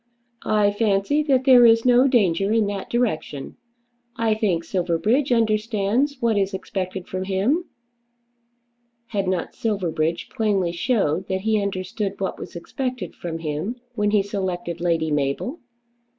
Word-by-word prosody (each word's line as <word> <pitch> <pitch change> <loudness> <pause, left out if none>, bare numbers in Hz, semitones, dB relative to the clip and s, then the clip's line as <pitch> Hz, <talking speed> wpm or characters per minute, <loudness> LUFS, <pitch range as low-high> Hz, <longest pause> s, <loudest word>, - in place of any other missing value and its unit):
"I 210 -1 +3
fancy 205 +6 +1
that 265 -2 +3
there 255 -2 +7
is 230 0 +5
no 250 +2 +5
danger 200 -6 +2
in 225 -1 +3
that 200 -1 -4
direction. 210 - -2 0.6
I 230 -2 +1
think 195 -6 0
Silverbridge 190 - 0
understands 225 +4 +1
what 230 -4 +2
is 195 0 -1
expected 190 -1 -4
from 185 0 -4
him." 210 - +1 1.4
Had 200 -3 -1
not 185 -2 -1
Silverbridge 170 -6 -1
plainly 200 -6 0
shown 185 - 0
that 190 0 -1
he 215 0 +1
understood 195 +1 -3
what 195 - -3
was - - -9
expected 250 - -4
from 165 -2 -5
him 165 +8 -3 0.2
when 210 -3 +1
he 205 -1 +3
selected 185 -4 -4
Lady 165 -2 +1
Mabel? 145 - -1
200 Hz, 135 wpm, -23 LUFS, 180-230 Hz, 1.4 s, there